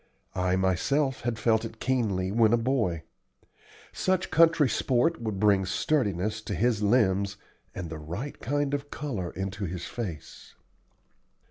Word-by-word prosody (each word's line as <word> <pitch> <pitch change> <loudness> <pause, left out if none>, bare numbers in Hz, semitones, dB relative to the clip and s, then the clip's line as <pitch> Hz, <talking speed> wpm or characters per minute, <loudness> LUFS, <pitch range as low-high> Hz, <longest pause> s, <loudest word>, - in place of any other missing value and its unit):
I 90 0 +1
myself 110 - +1
had 120 -2 -2
felt 115 -1 +2
it 115 -1 -7
keenly 105 -8 0
when 110 +1 +4
a - - +5
boy. 115 - 0 0.9
Such 185 0 0
country 165 -3 +5
sport 135 +6 +1
would 110 -4 -3
bring 100 -2 +4
sturdiness 105 - 0
to - - -4
his 115 -2 +1
limbs 100 -3 +2 0.4
and 90 -2 -4
the 80 - -5
right 85 - -6
kind 145 +2 -1
of 145 0 -3
color 115 -15 -4
into 95 +3 -4
his 90 0 -5
face. 95 -10 -7
110 Hz, 140 wpm, -28 LUFS, 95-130 Hz, 0.9 s, a